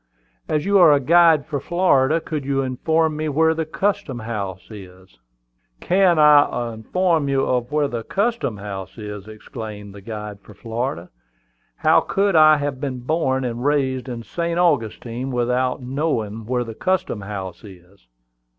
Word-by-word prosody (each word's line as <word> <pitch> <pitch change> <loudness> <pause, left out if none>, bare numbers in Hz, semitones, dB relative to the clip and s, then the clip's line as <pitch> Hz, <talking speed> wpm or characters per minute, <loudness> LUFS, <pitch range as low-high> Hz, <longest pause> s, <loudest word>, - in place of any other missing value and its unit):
"As 150 +1 0
you 200 0 +4
are 170 -4 +7
a 145 - +4
guide 165 +1 +4
for 145 - -3
Florida, 160 -3 +2
could 155 -3 -5
you 135 0 0
inform 160 +5 0
me 155 0 -2
where 160 +3 +3
the 160 -1 -3
custom 165 -7 -2
house 105 -4 -6
is?" 95 - -13 0.6
"Can 180 - +3
I 145 -6 +4
inform 160 - 0
you 135 -1 +1 0.2
where 150 0 +1
the 120 -4 -4
custom 200 - -1
house 100 0 -7
is!" 105 -2 -8
exclaimed 105 -2 -9
the 100 - -11
guide 105 -1 -7
for 105 - -16
Florida. 115 -5 -4 0.6
"How - - +4
could 195 -1 0
I 155 -1 +7
have 145 -2 -3
been 130 -4 -4
born 130 -2 0
and 120 0 -4
raised 135 -3 0
in 120 -2 -6
St. 170 +5 -3
Augustine 125 -6 0
without 125 +1 -1
knowing 115 -6 -2
where 125 0 0
the 115 -1 -8
custom 185 - -1
house 95 -3 -7
is?" 95 - -16
130 Hz, 155 wpm, -21 LUFS, 110-155 Hz, 0.6 s, are